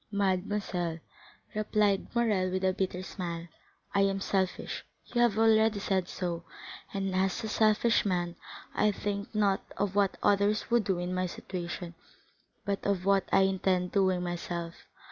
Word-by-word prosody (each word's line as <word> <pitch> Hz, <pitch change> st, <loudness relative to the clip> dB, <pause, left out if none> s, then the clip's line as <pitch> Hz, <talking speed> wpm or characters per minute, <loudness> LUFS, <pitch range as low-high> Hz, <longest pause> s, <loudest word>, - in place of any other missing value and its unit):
"Mademoiselle," 190 Hz, -3 st, 0 dB, 0.6 s
replied 210 Hz, -2 st, +1 dB
Morrel 210 Hz, -6 st, +2 dB
with 185 Hz, +1 st, -2 dB
a 185 Hz, 0 st, +3 dB
bitter 185 Hz, -1 st, -2 dB
smile, 170 Hz, -3 st, -5 dB, 0.5 s
"I 200 Hz, -, +3 dB
am 195 Hz, 0 st, +2 dB
selfish—you 195 Hz, +5 st, -2 dB
have 235 Hz, -4 st, +3 dB
already 220 Hz, -1 st, +4 dB
said 190 Hz, -2 st, 0 dB
so—and 180 Hz, +2 st, -5 dB
as 190 Hz, +3 st, 0 dB
a -, -, -2 dB
selfish 220 Hz, +2 st, +3 dB
man 175 Hz, -3 st, -1 dB, 0.4 s
I 210 Hz, -, +3 dB
think 205 Hz, +1 st, -3 dB
not 200 Hz, -2 st, +2 dB, 0.2 s
of 200 Hz, -1 st, 0 dB
what 200 Hz, -1 st, +2 dB
others 205 Hz, +2 st, +2 dB
would 235 Hz, -3 st, +3 dB
do 190 Hz, -3 st, +1 dB
in 180 Hz, +1 st, -2 dB
my 185 Hz, 0 st, 0 dB
situation, 175 Hz, -1 st, -6 dB, 0.7 s
but 200 Hz, 0 st, -1 dB
of 195 Hz, -2 st, 0 dB
what 195 Hz, -1 st, +3 dB
I -, -, +5 dB
intend 190 Hz, -1 st, +1 dB
doing 185 Hz, -3 st, +2 dB
myself. 170 Hz, -1 st, -4 dB
195 Hz, 145 wpm, -30 LUFS, 180-205 Hz, 0.7 s, I